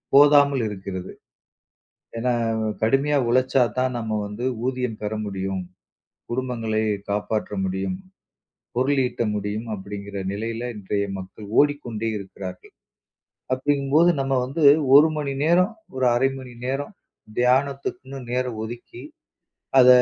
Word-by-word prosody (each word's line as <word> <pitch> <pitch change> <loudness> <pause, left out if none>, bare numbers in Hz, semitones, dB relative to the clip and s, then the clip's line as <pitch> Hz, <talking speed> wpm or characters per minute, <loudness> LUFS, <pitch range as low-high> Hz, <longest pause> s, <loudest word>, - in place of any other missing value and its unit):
போதாமல் 140 -3 +6
இருக்கிறது. 95 -2 -6 1.1
ஏன்னா 125 +2 0 0.5
கடுமையா 135 +5 +3
உழைச்சா 130 +2 +3 0.2
தான் 130 0 +1
நம்ம 110 -1 -3
வந்து 105 +4 -6 0.2
ஊதியம் 125 -4 -2
பெற 105 +1 -2
முடியும், 95 -1 -3 0.7
குடும்பங்களை 120 -3 -1 0.3
காப்பாற்ற 105 +1 -1
முடியும், 95 - -2 0.8
பொருள் 135 +2 +2
ஈட்ட 125 - -3
முடியும் 105 +3 -3
அப்டிங்கிற 100 0 -7
நிலையில 115 +3 -3
இன்றைய 100 0 -1
மக்கள் 95 +3 -9
ஓடிக்கொண்டே 120 -7 0
இருக்கிறார்கள். 95 -2 -9 0.8
அப்டிங்கும் 140 +1 0
போது 170 +2 +7
நம்ம 135 0 -1
வந்து 150 +4 -2 0.3
1 150 +3 +9
மணி 140 -2 -2
நேரம், 180 +6 +4 0.2
ஒரு 130 - +1
0.5 135 +2 +3
மணி 125 -2 -10
நேரம் 140 +8 -2 0.5
தியானத்துக்குன்னு 135 +1 0
நேரம் 125 -3 -1
ஒதுக்கி, 120 +1 -8 0.8
அத 125 -1 +8
125 Hz, 115 wpm, -24 LUFS, 105-135 Hz, 1.1 s, 1